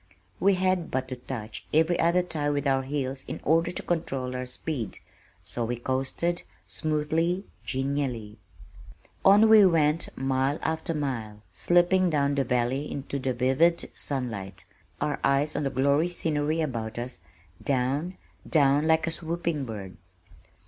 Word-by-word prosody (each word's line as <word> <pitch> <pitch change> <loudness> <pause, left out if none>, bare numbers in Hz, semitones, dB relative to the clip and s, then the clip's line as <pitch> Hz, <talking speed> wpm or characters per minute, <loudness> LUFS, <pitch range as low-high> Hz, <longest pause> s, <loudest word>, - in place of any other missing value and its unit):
We 195 +1 +4
had 185 -2 +1
but 130 0 -2
to 130 - -3
touch 115 -3 -7
every 160 +3 +3
other 170 +2 +3
tie 155 -4 -1
with 145 0 -1
our 135 -1 +2
heels 135 -1 -3
in - - -5
order 165 +3 +2
to - - -4
control 135 -7 -2
our 125 0 -3
speed, 125 -2 -4 0.5
so 120 - -3
we 120 +2 -1
coasted, 135 +8 -1 0.3
smoothly, 160 +4 0 0.2
genially. 130 -6 -2 0.8
On 205 +3 +7
we 220 -1 +8
went, 165 -3 +3
mile 135 +2 0
after 160 +1 -1
mile, 115 -8 -4
slipping 175 +1 +3
down 145 -3 +1
the 140 -1 +1
valley 125 +3 0
into 140 0 -4
the 130 -1 -1
vivid 135 +7 +2
sunlight, 100 -9 -4 0.3
our 150 0 -1
eyes 140 +2 +2
on 150 - -1
the - - +1
glorious 140 +7 +1
scenery 155 0 0
about 115 -7 -3
us, 120 +1 -5 0.4
down, 140 +7 0 0.3
down 145 -1 +4
like 160 0 +3
a 165 - -2
swooping 165 -3 -2
bird. 100 -5 -7
145 Hz, 145 wpm, -27 LUFS, 130-165 Hz, 0.8 s, we